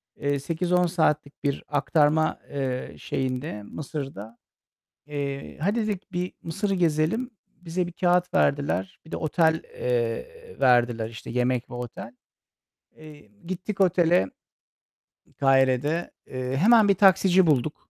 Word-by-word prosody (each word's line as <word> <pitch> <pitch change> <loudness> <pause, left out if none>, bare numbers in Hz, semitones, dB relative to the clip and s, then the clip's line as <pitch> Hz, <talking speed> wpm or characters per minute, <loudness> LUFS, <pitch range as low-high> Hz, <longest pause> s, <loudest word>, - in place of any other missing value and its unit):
Eee, 140 -1 -1
8-10 180 +4 +1
saatlik 155 -4 0
bir 140 -2 -1
aktarma, 150 +1 +2
eee, 130 - -3
şeyinde 130 - -3
Mısır'da. 135 -5 -7 0.7
Eee, 140 -2 -5
hadi, 215 +6 0
dedik, 200 -3 -4
bir 180 +1 -2
Mısır'ı 195 +5 -2
gezelim. 175 - +1 0.2
Bize 175 +1 -4
bir 175 - -8
kâğıt 180 0 +1
verdiler. 95 -10 +1
Bir 160 - -15
de - - -1
otel, 160 0 +1
eee, 125 - -3
verdiler, 120 -2 +3
işte, 110 - -9
yemek 125 0 0
ve - - -8
otel. 120 0 -7 0.8
Eee, 150 -8 -14 0.2
gittik 185 +3 -5
otele, 175 -2 +4
ııı, 95 - -8 0.9
Kahire'de. 135 +4 +2 0.2
Eee, 130 0 -3
hemen 220 - +6
bir 200 - +4
taksici 190 -1 +5
bulduk. 145 0 +2
150 Hz, 125 wpm, -25 LUFS, 130-180 Hz, 0.9 s, hemen